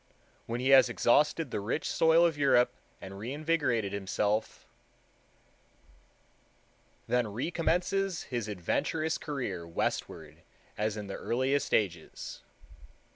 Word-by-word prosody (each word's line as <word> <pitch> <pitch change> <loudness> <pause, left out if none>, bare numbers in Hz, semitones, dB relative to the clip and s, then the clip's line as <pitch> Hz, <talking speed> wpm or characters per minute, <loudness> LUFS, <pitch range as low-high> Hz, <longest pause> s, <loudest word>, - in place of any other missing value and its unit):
When 115 +1 -3
he 130 +2 0
has 135 -2 +7
exhausted 150 +7 +2
the - - -2
rich 110 +9 -2
soil 165 +1 +4
of 165 -2 +1
Europe, 125 -4 +3 0.3
and 95 +1 -9
reinvigorated 130 -4 -1
himself, 105 +2 -1 2.4
"then 125 -2 +1
recommences 175 - -1
his 120 -4 -4
adventurous 155 - -1
career 110 - -4
westward 80 -1 -4 0.3
as 105 0 -1
in 105 - -5
the 100 - -6
earliest 135 +3 0
ages." 90 -7 -2
120 Hz, 105 wpm, -30 LUFS, 100-150 Hz, 2.4 s, has